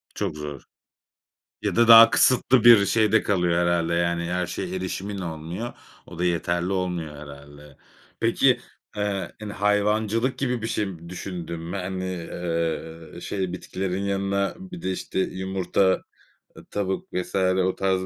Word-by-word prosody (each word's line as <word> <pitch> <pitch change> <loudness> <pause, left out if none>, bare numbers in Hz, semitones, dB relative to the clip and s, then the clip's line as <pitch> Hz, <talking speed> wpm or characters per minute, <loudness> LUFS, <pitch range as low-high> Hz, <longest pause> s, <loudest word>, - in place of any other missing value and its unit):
Çok 95 -7 -2
zor. 75 -2 -6 1.0
Ya - - -1
da 120 0 +4
daha 115 0 +10
kısıtlı 130 -1 +4
bir 115 -4 +8
şeyde 110 0 +3
kalıyor 90 -3 +1
herhâlde 85 -1 +1
yani 85 0 0
her 90 0 -1
şeye 180 - -4
erişimin 100 - -4
olmuyor. 85 +6 -5 0.3
O 85 -1 -11
da - - 0
yeterli 85 +1 0
olmuyor 90 -5 -2
herhâlde. 70 0 -12 0.4
Peki, - - +3 0.4
ııı, 100 -2 -2
hani 105 -1 -6
hayvancılık 105 +4 +1
gibi 125 -4 -1
bir 115 - -2
şey 90 -7 -3
düşündün 85 -2 -6
mü? 85 +4 -5
Hani, 95 -2 -4
ııı, 85 -1 -4
şey 95 -3 -3
bitkilerin 95 +1 -3
yanına 100 0 -1
bir 180 -2 -9
de 95 - -1
işte 95 - -4
yumurta, 95 0 0 0.7
tavuk 95 -2 -2
vs. 90 +1 -3
o 95 0 +2
tarz, 95 -1 +1
95 Hz, 140 wpm, -24 LUFS, 85-100 Hz, 1.0 s, daha